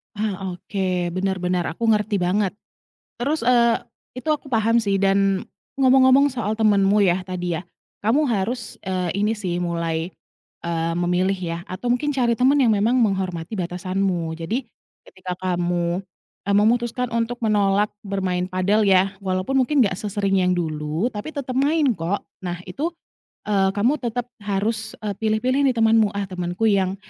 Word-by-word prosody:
Ah 195 -3 -3
oke, 180 -2 -2
benar-benar 185 -1 -1
aku 165 +8 -5
ngerti 210 -1 +1
banget, 185 +1 +1 0.7
terus, 285 +3 -1
eee, 235 -1 +3 0.3
itu 255 +5 -7
aku 295 -2 -1
paham 230 0 +3
sih 205 -3 0
dan 195 0 +2 0.4
ngomong-ngomong 260 +1 +6
soal 225 -4 -2
temanmu 205 -2 +3
yah, 185 -1 +2
tadi 180 -2 -3
ya, - - -6 0.4
kamu 275 +6 +3
harus, 230 +4 -2
eee, 185 -2 -1
ini 215 - +2
sih 185 -5 -3
mulai, 170 -1 -2 0.5
eee, 165 -1 -1
memilih 180 +2 +1
ya, 170 -2 -3
atau 215 +7 -4
mungkin 290 +4 0
cari 240 -3 +2
teman 270 +3 +4
yang 245 -4 +4
memang 215 +4 +2
menghormati 190 -2 -1
batasanmu, 180 -1 -2
jadi, 215 +11 -2 0.4
ketika 185 -1 -7
kamu, 175 -1 0 0.5
eee, 200 - +2
memutuskan 235 +3 +2
untuk 230 +1 -1
menolak 205 -1 +2 0.2
bermain 185 -2 -1
padel 195 +3 +2
ya, 190 0 +4
walaupun 190 +7 -1
mungkin 270 +2 +3
gak 190 -3 -1
sesering 200 -2 0
yang 180 0 +2
dulu, 155 +5 -2
tapi 210 +9 -6
tetap 260 -2 -3
main 290 0 +3
kok. 170 +5 -2 0.2
Nah 175 -1 -4
itu, 310 - -3 0.5
eee, 195 -2 +2
kamu 245 +9 +2
tetap 245 0 -3
harus 215 +2 -2
e 210 - -2
pilih-pilih 225 +5 +1
nih 255 - +1
temanmu, 225 -1 +4
ah 200 - -1
temenku 180 +2 -3
yang, 190 -1 +1
200 Hz, 155 wpm, -22 LUFS, 180-230 Hz, 0.7 s, ngomong-ngomong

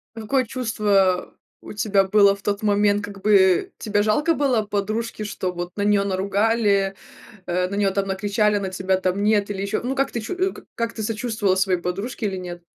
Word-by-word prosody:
Какое 250 +4 0
чувство 205 -6 +1 0.3
у - - -9
тебя 205 -2 +2
было 200 0 +4
в 200 - -16
тот 200 0 -2
момент? 205 0 +2
Как 200 -1 -8
бы 190 -3 +4
тебе 205 -1 0
жалко 295 +10 +2
было 265 -7 +1
подружки, 215 +2 -3
что 190 -3 -3
вот 175 0 -5
на - - -1
неё 205 -1 +3
наругали, 200 +1 +1 0.5
э, 180 +1 0
на 200 - -5
неё 200 -1 +2
там 195 0 -1
накричали, 205 +2 +1
на 195 -1 -3
тебя 190 0 0
там 185 +1 -1
нет 205 -1 +2
или 195 -1 -3
ещё? 200 +2 -2
Ну, 255 +3 -2
как 275 0 0
ты 235 - -3
чу 285 +12 -5 0.4
как 230 -1 -2
ты 220 - -6
сочувствовала 215 -2 0
своей 190 -2 +1
подружке 200 +6 -3
или 195 -2 -3
нет? 175 -1 -7
205 Hz, 195 wpm, -22 LUFS, 195-215 Hz, 0.5 s, было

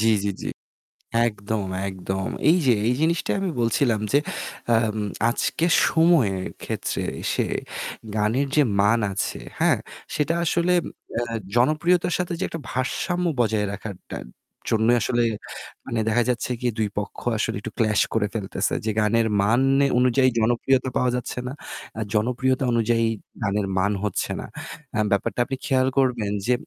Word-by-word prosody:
জ্বি, 110 +1 +4
জ্বি, 100 - 0
জ্বি। - - -3 0.8
একদম, 105 -1 -3 0.2
একদম। 95 0 -3 0.2
এই 170 - +6
যে 125 - +6
এই 120 - +3
জিনিসটািই 165 +1 +1
আমি 195 - 0
বলছিলাম 115 0 +2
যে 140 - +5 0.6
আম 110 -1 +1 0.3
আজকের 165 +7 0 0.2
সময়ের 135 - +3 0.2
ক্ষেত্রে - - -2 0.3
সে - - +1 0.7
গানের 110 +6 +1
যে 150 - +6 0.2
মান 105 +4 +4
আছে, 100 - -2 0.2
হ্যাঁ? - - +4 0.4
সেটা 150 +2 +1
আসলে 170 +2 +2
এম - - -9 0.3
এ - - 0 0.3
জনপ্রিয়তার 170 +7 +3
সাথে 180 -1 -1
যে - - -1
একটা 165 - -6
ভারসাম্য 175 +8 -1
বজায় 110 -3 +2
রাখার 100 0 -6 0.2
টা - - -3 0.5
জন্যই 110 +2 +4
আসলে 120 +4 +1 0.6
মানে 115 - -2
দেখা 115 +2 +3
যাচ্ছে 125 0 -1
কি? 125 - +1
২ 110 -1 +1
পক্ষ 105 - -6 0.2
আসলে 105 - -1
একটু - - -6
clash 110 -2 +3
করে 110 -2 +2
ফেলতেছে 105 -4 -2
যে 110 - +1
গানের 110 +2 +3
মান 115 +5 +3 0.2
এ - - +4
অনুযায়ী 130 +1 +4
জনপ্রিয়তা 120 +3 +2
পাওয়া 125 -1 +2
যাচ্ছে 125 0 -3
না। 125 - -4 0.5
আ - - -1
জনপ্রিয়তা 125 +4 +1
অনুযায়ী 115 0 +2 0.4
গানের 100 -1 0
মান 100 +2 +2
হচ্ছে 105 -3 -1
না। - - -5 0.5
আ - - +2
ব্যাপারটা 100 +4 0
আপনি 135 - -3
খেয়াল 130 -3 +2
করবেন 125 -6 +2 0.2
যে 125 - +4
120 Hz, 155 wpm, -24 LUFS, 105-135 Hz, 0.8 s, এই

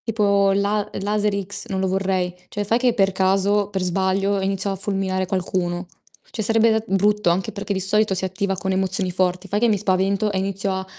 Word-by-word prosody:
Tipo 200 -3 +2
la 200 +1 0
laser 210 +1 0
X 205 +2 0
non 190 - -3
lo 190 - 0
vorrei. 185 -1 -1 0.2
Cioè, 205 - -3
fai 225 +4 +1
che 245 -1 +2
per 195 -1 +3
caso, 195 +2 +1
per 190 -2 -2
sbaglio, 195 +2 0
iniziano 195 +1 -1
a - - -4
fulminare 190 -1 -1
qualcuno. 180 -1 -2 0.5
Cioè 220 - -4
sarebbe 220 0 +3
brutto 205 0 +2
anche 180 +2 0
perché 200 0 -4
di 190 - -2
solito 210 +2 +2
si 190 - -1
attiva 195 +1 -2
con 190 +2 -2
emozioni 190 0 0
forti. 180 +1 -1
Fai 205 +2 -1
che 235 - +3
mi 215 -2 +2
spavento 195 +1 +1
e 195 - -2
inizio 195 +1 -2
a 190 0 -4
195 Hz, 200 wpm, -22 LUFS, 190-205 Hz, 0.5 s, per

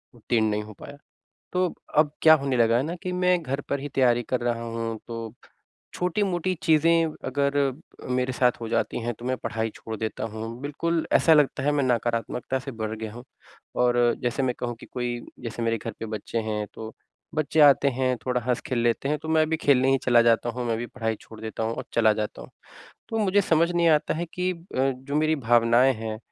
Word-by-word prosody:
उत्तीर्ण 115 -1 0
नहीं 105 0 -1
हो 110 0 -11
पाया। 145 - -10 0.6
तो 180 -1 +1 0.3
अब 150 -1 +5
क्या 160 0 +9
होने 140 -3 0
लगा 115 0 +4
है 125 - +2
ना 165 +4 -3
कि 185 -1 -3
मैं 180 0 +2
घर 140 0 -3
पर 140 - -1
ही 145 - -5
तैयारी 120 -2 +3
कर 125 - 0
रहा 120 -1 -1
हूँ। 115 -1 -4
तो 115 -2 -6 0.6
छोटी-मोटी 180 0 0
चीज़ें 165 +1 +4 0.2
अगर 140 +1 0 0.5
अ, - - -7
मेरे 125 0 0
साथ 125 -1 +3
हो 115 - -4
जाती 115 - 0
हैं 120 +1 -2
तो 120 - -10
मैं 130 0 0
पढ़ाई 110 0 -2
छोड़ 110 0 -7
देता 110 0 -3
हूँ। 115 +2 -6
बिल्कुल 165 +3 -1
ऐसा 165 - +5
लगता 145 -3 +2
है 145 - +2
मैं 145 -2 +1
नकारात्मकता 120 +1 -1
से 135 +1 -7
भर 110 0 -2
गया 110 -1 -6
हूँ 120 +2 -10 0.6
और 120 0 +3 0.3
जैसे 125 +2 -1
मैं 125 - 0
कहूँ 120 -1 -2
कि - - -11
कोई 120 -1 -3 0.2
जैसे 115 -1 -5
मेरे 115 -1 0
घर 115 - -6
पे 115 - -3
बच्चे 110 +1 -4
हैं 105 -1 -2
तो 110 0 -7 0.4
बच्चे 155 0 +1
आते 140 -1 +6
हैं 130 0 0
थोड़ा 125 -1 +1
हँस 125 -2 +1
खेल 125 - -1
लेते 120 +3 +1
हैं 150 - 0
तो 160 - -7
मैं 155 -1 +3
भी 160 - +2
खेलने 135 -4 +3
ही 135 - +3
चला 120 -2 +5
जाता 115 0 +3
हूँ 125 - -2
मैं 115 - 0
भी 120 - -4
पढ़ाई 115 -3 -3
छोड़ 110 - -13
देता 110 0 -5
हूँ 110 +1 -1
और - - -5
चला 110 -2 +5
जाता 105 0 -4
हूँ। - - -13 0.6
तो 225 - -2
मुझे 205 -1 +3
समझ 170 -1 +2
नहीं 170 -1 +3
आता 150 -2 +2
है 170 - -2
कि 180 0 0
अ, - - -9 0.2
जो 135 +2 -1
मेरी 155 +1 +2
भावनाएँ 120 +2 +4
हैं 110 0 -5
125 Hz, 220 wpm, -25 LUFS, 115-150 Hz, 0.6 s, क्या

